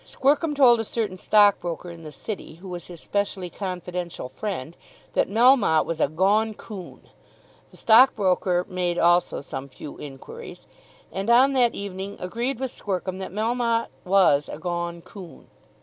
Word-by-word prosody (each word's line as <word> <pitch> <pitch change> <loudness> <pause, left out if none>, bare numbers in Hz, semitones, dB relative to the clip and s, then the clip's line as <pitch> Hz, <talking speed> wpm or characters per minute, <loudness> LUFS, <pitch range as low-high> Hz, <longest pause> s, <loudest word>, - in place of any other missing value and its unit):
Squercum 295 +3 +1
told 245 -4 +6
a - - 0
certain 215 -4 -3
stockbroker 180 -5 +2
in 170 -1 -11
the 155 -2 -9
City, 160 +1 -7
who 180 +4 -12
was 175 -2 -7
his 175 -2 -10
specially 195 -2 -2
confidential 180 -6 -5
friend, 170 -6 -5 0.4
that - - +1
Melmotte 225 - +4
was 165 -1 -4
a - - +3
"gone 205 +8 +1
coon." 195 -5 -10 0.6
The - - -17
stockbroker 195 -6 +4
made 180 -1 -2
also 175 -2 +3
some 140 -1 -6
few 140 +2 -10
enquiries, 150 - -10 0.5
and 195 +3 -3
on 260 +4 +6
that 245 -3 +3
evening 200 0 -6
agreed 235 +8 -3
with 260 -2 -3
Squercum 185 -1 -3
that 190 - -6
Melmotte 230 +2 0
was 180 -7 +3
a - - -6
"gone 170 +1 -4
coon." 185 -5 -12
190 Hz, 150 wpm, -24 LUFS, 175-225 Hz, 0.6 s, told